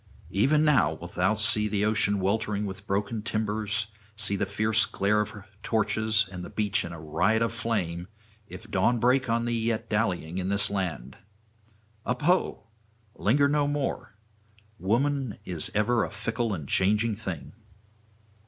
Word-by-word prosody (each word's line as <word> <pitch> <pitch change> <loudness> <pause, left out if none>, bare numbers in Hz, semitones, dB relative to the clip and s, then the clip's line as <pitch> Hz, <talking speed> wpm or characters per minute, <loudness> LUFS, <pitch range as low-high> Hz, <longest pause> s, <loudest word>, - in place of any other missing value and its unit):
Even 145 - +3
now 140 - +4
wilt 85 +2 -10
thou 95 +4 +2
see 105 -1 +2
ocean 105 -2 +3
weltering 105 +1 0
with 95 0 -7
broken 105 +3 -1
timbers, 110 0 -1 0.3
see 100 -2 0
the 100 0 -1
fierce 110 +2 +2
glare 105 +2 +1
of 105 +1 -3 0.3
torches 110 -1 +2
and 90 -1 -7
the - - -7
beach 105 -2 0
in 85 - -6
a 85 - -8
riot 90 +9 +1
of 115 0 -1
flame, 95 -8 -2 0.4
if 110 0 -11
dawn 100 +5 +2
break 130 +2 +2
on 115 +1 +1
thee 120 -1 -1
yet 115 -1 -2
dallying 95 -5 -1
in 95 0 -2
this 100 0 +2
land. 80 -10 -3 0.9
Up 125 +4 -2
ho! 180 +4 +1 0.5
linger 140 +7 +2
no 145 0 +1
more! 145 -6 -3 0.6
Woman 130 +5 0
is 85 -4 +1
ever 115 +2 +2
a - - -3
fickle 110 +3 -2
and 80 -8 -4
changing 105 +6 +2
thing.' 95 -7 -6
105 Hz, 155 wpm, -27 LUFS, 95-115 Hz, 0.9 s, now